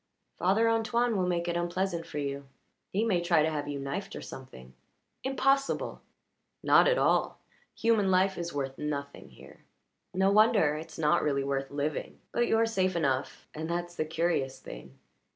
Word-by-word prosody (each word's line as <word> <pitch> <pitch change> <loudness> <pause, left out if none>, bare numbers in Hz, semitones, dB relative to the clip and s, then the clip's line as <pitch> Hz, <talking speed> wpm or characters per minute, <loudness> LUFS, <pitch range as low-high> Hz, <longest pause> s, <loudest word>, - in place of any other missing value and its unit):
"Father 200 +6 +3
Antoine 230 +1 +1
will 185 -2 +1
make 175 -1 -1
it 170 - -1
unpleasant 175 0 -2
for - - -7
you. 140 -1 -3 0.4
He 210 +4 +1
may 185 -6 +2
try 165 -3 +3
to 160 - +1
have 145 -1 -3
you 145 -1 -3
knifed, 140 +9 -5
or - - -6
something." 65 - -11 0.5
"Impossible!" 270 +1 0 0.6
"Not - - +6
at - - +3
all. - - +2 0.4
Human 225 -4 +2
life 190 +1 +3
is 170 0 -4
worth 135 -2 -4
nothing 140 -1 -5
here. - - -15 0.6
No 190 +1 +3
wonder 210 -7 +4
it's 160 +1 -8
not 150 -2 +3
really 140 -2 0
worth 135 0 -2
living. 145 +1 -3
But 240 0 +1
you're 225 0 +3
safe 185 -5 0
enough, 135 -6 -1
and 160 +1 -5
that's 175 0 -3
the 165 - -1
curious 160 -4 -1
thing." 65 +2 -11
170 Hz, 170 wpm, -29 LUFS, 145-200 Hz, 0.6 s, Not